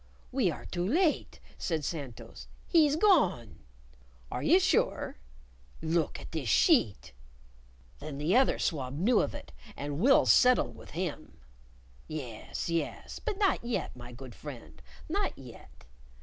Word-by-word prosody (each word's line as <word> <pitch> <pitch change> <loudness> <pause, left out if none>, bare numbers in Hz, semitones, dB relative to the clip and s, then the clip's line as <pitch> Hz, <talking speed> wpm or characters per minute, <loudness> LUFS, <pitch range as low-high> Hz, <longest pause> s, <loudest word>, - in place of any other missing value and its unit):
"We 250 -7 +2
are 160 - -6
too 175 -1 -3
late!" 320 - +1 0.2
said 160 -4 -2
Santos. 140 -8 -7 0.2
"He's 305 -4 +4
gone!" 310 - +2 0.7
"Are - - -3
you 345 +5 +5
sure 365 - 0 0.6
"Look 160 0 -1
at - - -11
this - - -3
sheet." 105 - +3 0.9
"Then 145 -3 -7
the 155 +8 +1
other 265 +1 +4
swab 135 -3 -2
knew 215 +7 +3
of - - -3
it, - - -9 0.3
and 145 +1 -4
we'll 270 +8 +5
settle 250 0 +5
with - - -14
him." 155 - -4 0.7
"Yes, 130 -8 -6
yes. 170 -1 -3
But 435 -4 -3
not 395 - +2
yet, 235 0 -3
my 120 0 -10
good 125 0 -10
friend 65 - -10 0.3
not - - -2
yet. - - -14
170 Hz, 135 wpm, -30 LUFS, -, 0.9 s, you